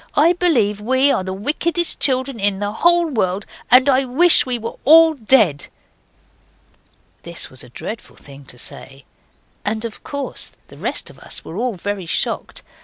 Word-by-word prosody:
I 325 +4 +4
believe 240 - +1
we 260 +5 +2
are 190 - 0
the 190 - -5
wickedest 310 - -2
children 260 -2 +1
in 200 -1 +2
the 205 +1 -3
whole 345 +9 +3
world, 200 - -2 0.2
and 255 +2 +6
I 270 -1 +3
wish 275 +5 +5
we 250 -1 -1
were 230 0 -7
all 320 +3 +7
dead!' 220 - +2 1.5
This 170 0 -4
was 130 - -9
a 125 - -14
dreadful 215 - -8
thing 140 0 -14
to 125 - -8
say, 135 +2 -8 0.6
and 220 +2 -2
of 225 - -8
course 285 -1 -3 0.2
the - - -14
rest - - -3
of - - -19
us - - -4
were 165 - -9
all 240 +1 -2
very 195 0 -5
shocked. - - -3
230 Hz, 170 wpm, -19 LUFS, 195-280 Hz, 1.5 s, all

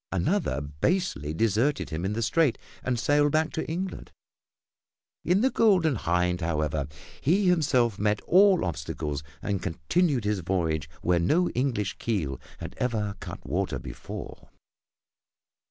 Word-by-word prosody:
Another 95 - 0
basely 75 - -1
deserted 115 - +1
him 80 +2 -3
in 100 - -1
the 115 +2 -1
Strait 135 0 +2 0.2
and 130 -2 -1
sailed 145 +3 +3
back 155 +1 +2
to 160 - -3
England. 180 +3 -4 1.1
In 180 +4 +3
the 265 +2 +3
Golden 185 -9 +4
Hind, 90 -3 0
however, 75 -3 -1 0.3
he 190 +8 +3
himself 130 - +2
met 105 0 +1
all 190 0 +5
obstacles 75 -2 -3 0.2
and 100 -2 -1
continued 135 - 0
his 105 -1 0
voyage 80 -4 -1
where 90 0 +3
no 165 - +2
English 120 -7 -1
keel 80 - -2 0.2
had - - -7
ever 105 -5 -1
cut - - -8
water - - -1
before. - - -8
105 Hz, 135 wpm, -27 LUFS, -, 1.1 s, all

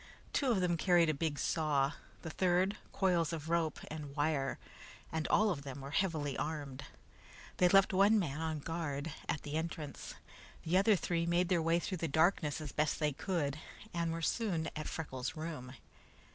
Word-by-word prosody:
Two 275 - +2
of 215 -6 +3
them 175 -2 +1
carried 175 -1 +4
a - - -2
big 150 0 -1
saw, 145 -4 +1 0.3
the 160 - -5
third, 185 +3 +2 0.2
coils 175 -5 +2
of 160 -1 -5
rope 165 -2 +1
and 150 -3 -6
wire, 145 -2 0 0.5
and 160 -1 -1
all 215 -1 +4
of 150 -6 -3
them 140 -1 -7
were 135 +1 -7
heavily 155 -5 0
armed. 145 -3 -4 0.7
They 180 - +5
left 195 +1 +5
one 200 +3 +5
man 160 -6 -1
on 160 -2 -2
guard 155 -2 -3 0.2
at 160 - -1
the 145 - -6
entrance. 160 -2 -4 0.5
The 165 +3 0
other 200 +3 +5
three 170 -2 -1
made 175 +1 +2
their 175 -3 +3
way 165 +1 +3
through 180 +1 -3
the 165 - -1
darkness 160 0 +2
as 150 -3 -6
best 155 0 0
they 150 -2 +1
could, 150 -3 -2 0.3
and 170 -1 0
were 165 0 -4
soon 175 -6 0
at 155 - -4
Freckles' 130 -2 -4
room. 155 -6 -5
160 Hz, 180 wpm, -34 LUFS, 150-175 Hz, 0.7 s, They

